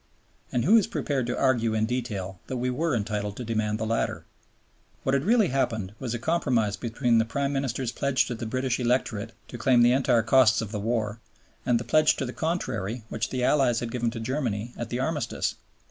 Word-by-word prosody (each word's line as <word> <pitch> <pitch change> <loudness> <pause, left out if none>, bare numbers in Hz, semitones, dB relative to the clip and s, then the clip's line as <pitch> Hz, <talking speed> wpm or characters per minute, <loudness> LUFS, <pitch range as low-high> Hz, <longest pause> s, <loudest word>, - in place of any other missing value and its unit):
And 120 -1 0
who 220 +7 +7
is 215 - +3
prepared 135 -4 -1
to 120 - -2
argue 115 -4 +2
in 110 0 +2
detail 105 -6 -3
that 130 - -3
we 125 +1 -1
were 155 +2 0
entitled 105 -2 -2
to 125 - -4
demand 110 -1 -1
the 110 - -2
latter? 115 +1 -1 0.8
What 135 - +1
had 140 0 +2
really 220 -2 +4
happened 110 -7 -1
was 120 -3 -3
a - - -1
compromise 120 -8 +1
between 115 +2 +1
the - - +4
Prime 140 +5 -2
Minister's 130 -3 -1
pledge 140 0 +1
to 120 - -4
the 115 -1 -5
British 130 +2 -1
electorate 120 -3 0 0.2
to 120 - -8
claim 120 0 +4
the 120 - +6
entire 125 -3 +3
costs 120 -2 +5
of 110 -3 -4
the 105 - -3
war 110 0 -1 0.5
and 120 -2 +3
the - - -4
pledge 155 +4 +4
to 135 - -2
the 125 - -5
contrary 125 - -2
which 110 - -2
the 130 -1 -2
Allies 125 -4 +3
had 120 -1 -4
given 120 -1 0
to 115 0 -6
Germany 120 -2 -2
at 120 -1 -5
the 120 - -2
Armistice. 150 +2 -1
120 Hz, 210 wpm, -26 LUFS, 110-130 Hz, 0.8 s, who